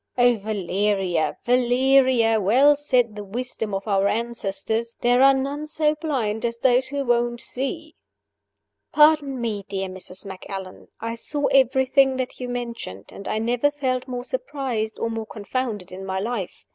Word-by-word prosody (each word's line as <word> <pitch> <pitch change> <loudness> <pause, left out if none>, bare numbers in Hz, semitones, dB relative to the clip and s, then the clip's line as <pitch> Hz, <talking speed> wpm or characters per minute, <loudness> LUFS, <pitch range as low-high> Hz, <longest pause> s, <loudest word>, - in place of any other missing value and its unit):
Oh, 245 0 +5
Valeria! 195 -4 -1
Valeria! 250 -2 +3
Well 260 +9 +5
said 250 -6 +1
the 210 - -6
wisdom 225 +1 -4
of 195 +2 -5
our 195 -1 +2
ancestors 230 0 -2
there 245 +1 +4
are 275 0 +7
none 280 +3 -3
so 305 0 +1
blind 260 -9 -2
as 235 0 -1
those 255 +1 +3
who 280 0 -3
won't 240 0 +1
see." 310 +7 -4 1.0
"Pardon 300 -3 +4
me, 220 -4 -2
dear 195 -1 -3
Mrs. 185 +1 -7
Macallan, 190 0 -8
I 230 +1 -3
saw 285 +5 -3
everything 265 0 +4
that 255 -1 -4
you 250 -1 -4
mention, 235 - -5
and 200 - -10
I 215 - -1
never 240 +5 +1
felt 260 -3 -2
more 245 -1 -4
surprised 265 - -3
or 230 - -2
more 225 -1 -4
confounded 215 -3 -4
in 190 +1 -8
my 190 0 -3
life. 210 -3 -4
240 Hz, 155 wpm, -23 LUFS, 210-265 Hz, 1.0 s, are